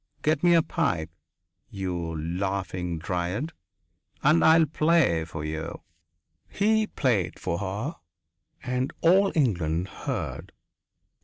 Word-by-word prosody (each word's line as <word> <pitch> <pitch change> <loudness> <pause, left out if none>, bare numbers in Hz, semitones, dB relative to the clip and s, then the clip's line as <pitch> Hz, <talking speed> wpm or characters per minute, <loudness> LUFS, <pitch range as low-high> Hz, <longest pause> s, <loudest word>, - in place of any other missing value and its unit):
Get 155 -1 +2
me 175 -1 +5
my 165 - +6
pipe, 85 - -1 0.6
you 85 -4 -3
laughing 90 +1 -2
dryad, 90 - -3 0.7
and 150 +4 +5
I 160 +1 +7
will 165 - +5
play 155 - +2
for 80 -1 -6
you." 80 +1 -5 0.7
He 215 +1 +2
played 115 - 0
for 85 -1 -2
her 105 - -3 0.7
and 125 +2 -1
all 190 +4 +5
England 90 - +1
heard. - - -5
100 Hz, 110 wpm, -26 LUFS, -, 0.7 s, I